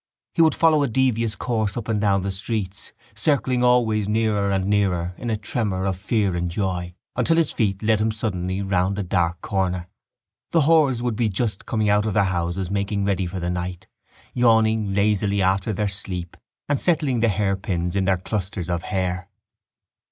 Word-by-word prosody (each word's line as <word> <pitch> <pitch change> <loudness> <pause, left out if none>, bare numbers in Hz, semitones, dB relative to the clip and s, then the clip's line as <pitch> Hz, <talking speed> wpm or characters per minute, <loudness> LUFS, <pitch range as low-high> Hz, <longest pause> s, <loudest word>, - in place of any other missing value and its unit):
He 165 - +2
would 160 -3 +4
follow 160 -2 +4
a 140 - +2
devious 115 -3 +1
course 110 -4 -1
up 115 - -4
and 110 -3 0
down 100 -2 +2
the 100 - -1
streets, 100 0 -4 0.2
circling 125 +2 +1
always 110 -4 +3
nearer 105 -2 +1
and 95 -1 0
nearer 95 -4 +1
in 120 - -5
a 110 - 0
tremor 105 -3 -2
of 95 -1 0
fear 100 -1 0
and 85 0 -1
joy, 90 -1 -3 0.2
until 165 - +2
his 165 -3 +2
feet 100 -3 -1
led 110 -1 +2
him 110 +1 +1
suddenly 95 -3 -2
round 95 0 0
a 100 - -1
dark 85 -2 0
corner. 95 -3 -1 0.7
The 165 - +5
whores 145 -5 +3
would 120 -3 -1
be 115 -1 +1
just 100 0 -2
coming 110 -2 0
out 105 +1 +3
of 105 - -2
their 100 - +4
houses 90 0 -2
making 100 0 -1
ready 95 -2 0
for 90 +2 -5
the 90 0 -2
night, 90 0 -4 0.5
yawning 110 -4 +3
lazily 100 0 +2
after 95 +2 +1
their 105 +1 -1
sleep 95 -3 -4 0.3
and 145 -1 +1
settling 150 -8 +1
the 115 0 +3
hairpins 95 -3 -1
in 95 -1 +1
their 95 0 +2
clusters 95 -2 -4
of 85 -1 -1
hair. 95 -1 -2
100 Hz, 185 wpm, -23 LUFS, 95-110 Hz, 0.7 s, The